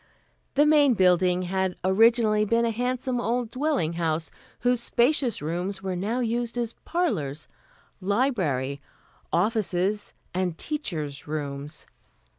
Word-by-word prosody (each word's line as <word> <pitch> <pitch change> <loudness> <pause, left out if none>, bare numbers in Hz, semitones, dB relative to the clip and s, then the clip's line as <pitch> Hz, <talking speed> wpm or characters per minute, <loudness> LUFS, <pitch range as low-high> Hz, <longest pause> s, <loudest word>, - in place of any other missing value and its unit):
The 290 +2 +5
Main 295 -4 +5
Building 180 -1 +3
had 190 0 -1
originally 215 +2 +4
been 230 +2 +2
a 230 - +1
handsome 250 +1 -1
old 240 0 -1
dwelling 265 - 0
house, 160 0 -1 0.3
whose 245 0 +2
spacious 240 - +2
rooms 180 +5 -3
were 190 -1 -2
now 215 +8 -1
used 235 0 -1
as 235 -1 -1
parlors, 155 - -1 0.5
library, 185 - 0 0.5
offices 205 0 0 0.2
and 180 -2 -1
teachers' 155 - -4
rooms. 145 0 -5
205 Hz, 115 wpm, -26 LUFS, 175-240 Hz, 0.5 s, The